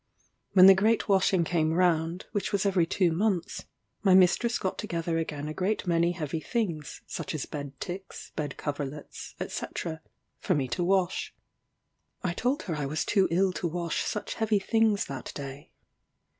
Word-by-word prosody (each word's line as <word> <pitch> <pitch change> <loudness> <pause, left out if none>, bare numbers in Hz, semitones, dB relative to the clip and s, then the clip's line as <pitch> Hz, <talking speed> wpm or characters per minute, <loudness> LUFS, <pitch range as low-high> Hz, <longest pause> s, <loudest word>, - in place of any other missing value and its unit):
When 185 -1 +9
the 195 - +11
great 215 +4 +2
washing 190 -3 +3
came 160 -1 +1
round, 170 0 +1
which 205 -2 -2
was 200 -1 +1
every 185 -4 +3
two 180 0 +2
months, 190 +1 -1 0.4
my 190 -3 +5
mistress 190 +6 +4
got 185 - -3
together 165 -1 -1
again 150 -2 -4
a 155 - -4
great 195 +6 -1
many 170 0 +2
heavy 160 -2 -3
things, 170 -6 -3
such - - -5
as 150 - -3
bed 140 -2 -7
ticks, 190 +2 -7
bed 145 -3 -3
coverlets, 145 0 -5
&c. - - -4 0.7
for 185 - +1
me 135 -3 0
to 150 +8 -1
wash. 185 0 0 0.9
I 175 -3 0
told 255 - 0
her 170 - -3
I 145 -2 -2
was 155 +3 -1
too 195 -3 +3
ill 185 +2 +2
to 175 - -2
wash 170 0 -2
such 210 - -3
heavy 220 -2 +1
things 215 +1 +2
that 135 -2 -6
day. 140 0 -7
175 Hz, 170 wpm, -28 LUFS, 155-195 Hz, 0.9 s, the